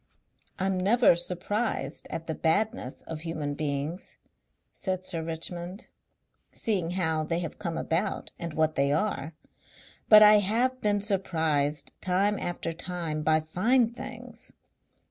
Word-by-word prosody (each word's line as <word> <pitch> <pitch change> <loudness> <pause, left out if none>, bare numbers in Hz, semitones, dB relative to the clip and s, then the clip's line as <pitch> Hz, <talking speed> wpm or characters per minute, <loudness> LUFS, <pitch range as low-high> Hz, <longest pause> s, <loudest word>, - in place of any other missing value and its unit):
"I'm 190 0 0
never 220 +2 +5
surprised 180 - -2
at 165 - -5
the 160 - -2
badness 160 - 0
of 160 -1 -6
human 155 -3 -3
beings," 145 +4 -3 0.6
said 185 -1 -3
Sir 170 -3 -3
Richmond; 170 +5 -6 0.6
"seeing 190 -7 -1
how 160 -3 +1
they 165 +2 -1
have 170 -3 -4
come 170 -4 -3
about 185 +5 -1
and 170 -2 -5
what 155 0 +2
they 140 -1 +2
are; 165 -2 -1 0.7
but 215 -1 +10
I 210 0 +8
have 240 +6 +1
been 205 -1 +1
surprised 160 -7 0
time 195 +3 +1
after 175 -1 -3
time 165 -3 -3
by 155 0 +3
fine 225 +9 +2
things.... 245 -2 -8
175 Hz, 130 wpm, -28 LUFS, 160-210 Hz, 0.7 s, but